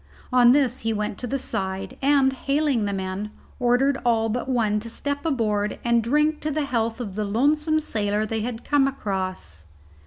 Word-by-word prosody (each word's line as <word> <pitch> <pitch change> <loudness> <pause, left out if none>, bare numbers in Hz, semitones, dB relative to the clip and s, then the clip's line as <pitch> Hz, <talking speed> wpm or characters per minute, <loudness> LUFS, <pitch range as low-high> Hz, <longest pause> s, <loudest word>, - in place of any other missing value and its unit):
On 245 -1 +7
this 260 -2 +2
he 225 0 -1
went 210 -1 -3
to 250 - -3
the 275 - -1
side, 190 -5 -3
and, 275 -1 +3
hailing 275 -4 0
the 200 - -1
men, 190 +1 -3 0.3
ordered 255 +3 +2
all 225 -2 +2
but 245 +4 -3
one 220 -4 +1
to 230 +2 -7
step 285 +4 -3
aboard 210 -7 0
and 235 -1 +3
drink 300 +6 +1
to 305 - -2
the 300 0 -1
health 230 -3 -1
of 215 -6 -5
the 210 +2 -2
lonesome 300 +9 +2
sailor 210 -7 -1
they 220 0 -2
had 230 +1 -5
come 285 -2 +3
across. 185 - -4
235 Hz, 185 wpm, -24 LUFS, 210-275 Hz, 0.3 s, On